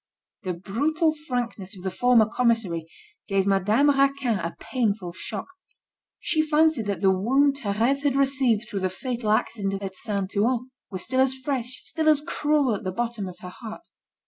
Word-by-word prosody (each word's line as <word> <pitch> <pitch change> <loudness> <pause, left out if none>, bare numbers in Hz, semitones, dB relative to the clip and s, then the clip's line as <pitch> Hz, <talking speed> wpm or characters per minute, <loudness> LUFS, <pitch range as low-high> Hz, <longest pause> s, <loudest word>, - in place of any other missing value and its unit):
The 185 -5 -3
brutal 305 - 0
frankness 245 -10 -4
of 180 - -11
the 190 - -2
former 245 +2 +4
commissary, 220 -8 0 0.4
gave 195 -1 +1
Madame 205 +8 +3
Raquin 275 -5 +2
a 170 0 -4
painful 210 -8 -1
shock. 200 +2 -5 0.7
She 315 - +2
fancied 310 -6 +2
that 195 -4 -2
the 190 -1 +5
wound 270 +9 +2
Thérèse 235 +3 0
had 285 -2 +1
received 265 -5 +2
through 200 - -3
the 185 0 0
fatal 235 +3 -4
accident 200 -2 0
at 190 -1 -4
Saint 200 -1 -3
Ouen, 245 +4 +1 0.2
was 185 -2 -5
still 260 +1 -1
as 265 0 +4
fresh, 260 -2 -4
still 315 -1 +1
as 305 -2 +5
cruel 295 -5 +1
at 205 - -4
the 185 - -2
bottom 230 -1 -3
of 180 - -11
her 180 - -7
heart. 220 +2 -7
230 Hz, 170 wpm, -25 LUFS, 195-275 Hz, 0.7 s, the